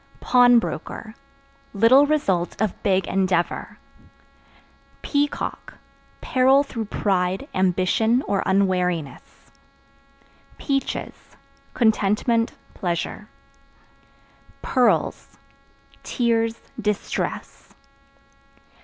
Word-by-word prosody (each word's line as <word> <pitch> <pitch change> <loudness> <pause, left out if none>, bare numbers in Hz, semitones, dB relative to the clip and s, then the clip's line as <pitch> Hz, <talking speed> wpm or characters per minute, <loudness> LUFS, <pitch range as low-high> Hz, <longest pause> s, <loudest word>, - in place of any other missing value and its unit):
Pawnbroker 245 -2 +2 0.6
Little 255 +8 +6
result 195 - 0
of 215 -2 -2
big 190 -2 +1
endeavor. 185 -2 -1 1.3
Peacock 290 0 -2 0.5
Peril 265 +2 +3
through 230 -5 -5
pride, 190 +3 -1
ambition 190 +7 +1
or 200 -1 -1
unwariness. 180 -5 -1 1.1
Peaches 275 -2 -2 0.6
Contentment, 230 +1 +1 0.2
pleasure. 175 +3 -4 1.4
Pearls 250 -2 0 0.6
Tears, 230 -2 0 0.3
distress. 210 -1 -4
215 Hz, 60 wpm, -23 LUFS, 185-245 Hz, 1.4 s, Little